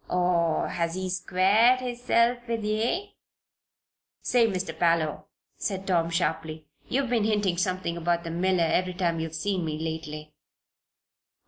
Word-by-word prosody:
Or 175 -2 +1
has 170 0 -2
he 185 0 -3
squared 195 +7 +3
hisself 245 -1 +1
with 230 -2 -2
ye?" 225 - -1 1.1
"Say, 240 -2 +3
Mister 185 -5 -3
Parloe," 165 -1 +1 0.3
said 195 -2 -3
Tom, 170 -3 +1
sharply, 160 -2 -2 0.2
"you've 265 -1 0
been 230 -3 +2
hinting 205 -4 +1
something 180 -1 -1
about 170 0 0
the 165 - -5
miller 180 +1 +1
every 180 +2 0
time 170 -3 0
you've 160 0 -4
seen 190 +1 -1
me 155 -1 -3
lately. 155 -1 -5
180 Hz, 135 wpm, -27 LUFS, 165-215 Hz, 1.1 s, squared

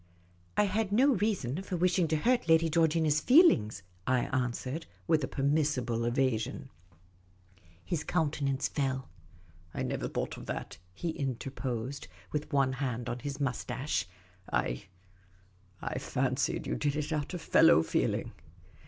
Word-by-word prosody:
" 90 0 -32
I 210 - +5
had 205 +1 0
no 265 +7 +5
reason 190 - -1
for 190 -2 -4
wishing 180 0 +2
to 155 - +1
hurt 240 +3 +1
Lady 165 0 +5
Georgina's 160 -2 +3
feelings," 180 - +5 0.2
I 130 -1 +3
answered, 130 +5 -2 0.2
with 160 -3 +2
a - - 0
permissible 135 -5 0
evasion. 120 -2 0 1.2
His 170 -4 -2
countenance 145 -5 0
fell. 135 -2 -2 0.3
" 85 -1 -28
I - - -1
never - - -2
thought - - -3
of - - -10
that," 80 - -5 0.2
he 170 - -2
interposed, 135 -2 -4 0.2
with 150 +1 -3
one 135 -2 +2
hand 125 -2 -3
on 120 +1 -3
his 140 +3 -5
moustache. 130 -1 -2 0.2
" 90 +1 -20
I - - -1 0.5
— 95 0 -32
I - - -2
fancied 135 +6 -1
you - - -2
did 145 -1 0
it 150 +1 -2
out 150 +4 -2
of 175 - -5
fellow 80 - +6
feeling." - - 0
140 Hz, 150 wpm, -31 LUFS, 120-160 Hz, 1.2 s, fellow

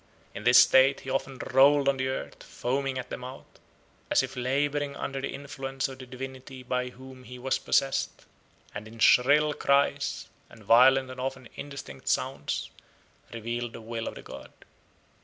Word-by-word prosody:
In 105 - -8
this 120 0 +7
state 130 +2 +6
he 130 - -6
often 135 -1 -2 0.2
rolled 140 +1 +6
on 140 -1 +3
the 130 0 -1
earth, 130 - -5
foaming 135 +1 -2
at 125 - -6
the - - -3
mouth, 130 +2 -9 0.6
as - - +3
if - - -6
labouring 140 +3 -1
under 135 0 -4
the 135 - -3
influence 135 -1 -4
of 135 -1 -10
the 130 - -10
divinity 130 +1 -8
by 125 0 -2
whom 130 +1 -13
he 125 +1 -10
was 130 +1 -1
possessed, 135 -1 0 0.5
and, 105 +1 -7
in 115 +1 -13
shrill 145 +6 +5
cries, 140 0 +1 0.2
and 110 - -16
violent 130 +4 +5
and 130 - -9
often 130 -1 -4
indistinct 140 - -9
sounds, - - -1 0.6
revealed 115 +1 -4
the - - -8
will 115 0 -5
of - - -5
the - - -10
god. - - -11
130 Hz, 170 wpm, -28 LUFS, 125-135 Hz, 0.6 s, this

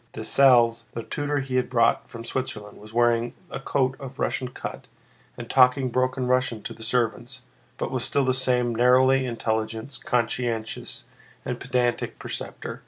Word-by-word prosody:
Dessalles, 120 0 +4
the 115 - -4
tutor 145 +2 -2
he 130 -1 -2
had 125 - 0
brought 115 -2 +2
from 115 -1 -9
Switzerland, 105 -5 -5
was 105 +1 -13
wearing 120 0 +2 0.2
a - - -4
coat 135 -1 0
of 135 -1 -9
Russian 130 - -1
cut 125 - -7 0.5
and 120 - -7
talking 130 +1 +4
broken 130 +1 0
Russian 125 -3 +1
to - - -5
the 115 - -15
servants, 120 +2 -1 0.3
but - - -3
was - - -2
still 140 -1 +1
the 130 - +2
same 125 -2 +2
narrowly 130 +2 +4
intelligent, 110 +2 -3
conscientious, 115 -2 -2 0.4
and - - -3
pedantic 120 -1 -1
preceptor. - - -6
125 Hz, 155 wpm, -25 LUFS, 115-130 Hz, 0.5 s, Dessalles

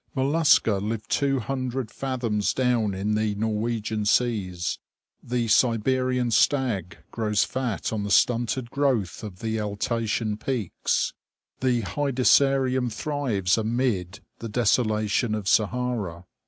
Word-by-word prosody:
Mollusca 135 -6 +3
live 110 +1 -3
two 140 -1 +1
hundred 130 -1 -3
fathoms 120 -6 -1
down 120 -6 +1
in 100 +3 -1
the 105 -1 0
Norwegian 110 0 -2
seas. 100 -6 0 0.4
The 120 -1 -2
Siberian 125 +2 +2
stag 110 - +1
grows 105 -3 +1
fat 125 -5 -3
on 110 - -1
the 100 - -3
stunted 120 +3 +2
growth 130 -10 0
of 105 -4 -7
Altaian 110 0 -1
peaks. 120 -9 -1 0.5
The 125 -2 +1
Hedysarium 130 +2 +2
thrives 110 -7 0
amid 110 -4 -1 0.2
the 115 - -6
desolation 110 -1 +1
of 105 -3 -5
Sahara. 110 -7 0
115 Hz, 110 wpm, -25 LUFS, 105-130 Hz, 0.5 s, Mollusca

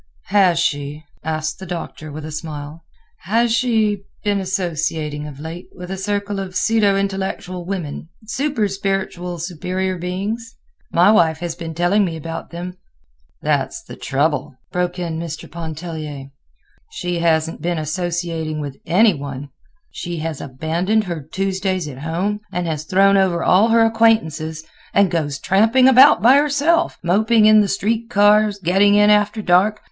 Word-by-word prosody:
_" - - -35 0.3
"Has 190 -4 +4
she," 145 -2 -1 0.2
asked 155 +1 -3
the 190 - -8
Doctor, 165 -3 -6
with 155 +1 -7
a 155 - -7
smile, 155 0 -7 0.4
"has 225 +6 +1
she 220 -4 +1 0.2
been 205 -1 +1
associating 160 -5 -2
of 140 -2 -10
late 165 +3 -7
with 180 0 -8
a - - -2
circle 205 +1 -2
of 190 -2 -6
pseudo 210 -3 +2
intellectual 190 -2 -3
women—super 205 - -3
spiritual 195 -3 -3
superior 180 +2 -3
beings? 205 +6 -4 0.4
My 180 +5 +5
wife 165 -7 +3
has 170 0 -4
been 165 -2 -7
telling 175 +5 +2
me 165 -4 -2
about 165 +1 -6
them." 180 +2 -7 0.7
"That's - - -1
the - - -10
trouble," 145 -1 -1 0.2
broke 180 0 -1
in 170 -3 -3
Mr. 165 -2 -6
Pontellier, 155 -4 -7 0.6
"she 175 -1 -3
hasn't 165 -1 +1
been 170 +1 -1
associating 165 -1 -3
with 145 -2 -6
any 210 +4 +5
one. 140 -1 -7 0.4
She 175 -1 -5
has 160 -2 -4
abandoned 165 +11 -1
her 170 -5 -5
Tuesdays 190 +2 -2
at 135 -3 -8
home, 175 +7 -2
has 160 -4 -3
thrown 195 +3 +4
over 185 -3 +2
all 195 +5 +4
her 230 0 +4
acquaintances, 165 -9 +1 0.3
and 200 -3 +4
goes 150 -5 -1
tramping 225 - +3
about 265 -1 +7
by 255 +4 +7
herself, 300 +4 +2
moping 215 +5 +3
in 215 0 +7
the 205 - +1
street 225 +4 -1
cars, 210 -1 +4
getting 195 +3 +3
in 210 0 +5
after 210 +1 +2
dark. 195 +4 +3
180 Hz, 150 wpm, -20 LUFS, 160-205 Hz, 0.7 s, about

